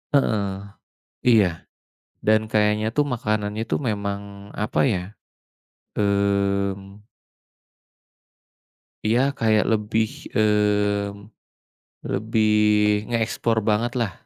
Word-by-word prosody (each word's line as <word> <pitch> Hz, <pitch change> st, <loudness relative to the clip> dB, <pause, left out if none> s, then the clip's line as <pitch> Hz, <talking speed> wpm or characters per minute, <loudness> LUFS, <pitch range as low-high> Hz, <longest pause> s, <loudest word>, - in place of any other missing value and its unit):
heeh, 100 Hz, -7 st, 0 dB, 0.6 s
iya, 100 Hz, -9 st, +3 dB, 0.6 s
dan 110 Hz, 0 st, +3 dB
kayaknya 105 Hz, 0 st, +1 dB
tuh 145 Hz, -, +4 dB
makanannya 110 Hz, -3 st, -2 dB
itu -, -, +1 dB
memang 100 Hz, -3 st, -4 dB
apa 105 Hz, -, -1 dB
ya? 95 Hz, -7 st, -1 dB, 0.9 s
Mmm. 100 Hz, -1 st, 0 dB, 2.1 s
Iya 115 Hz, +3 st, +3 dB, 0.2 s
kayak 110 Hz, -1 st, +3 dB
lebih, 110 Hz, 0 st, +1 dB, 0.3 s
mmm, 105 Hz, -1 st, +1 dB, 0.8 s
lebih 110 Hz, +3 st, -1 dB, 0.7 s
ngeeksplor 115 Hz, -1 st, 0 dB
banget 115 Hz, +3 st, +1 dB
lah. 110 Hz, -5 st, -1 dB
105 Hz, 80 wpm, -23 LUFS, 100-110 Hz, 2.1 s, tuh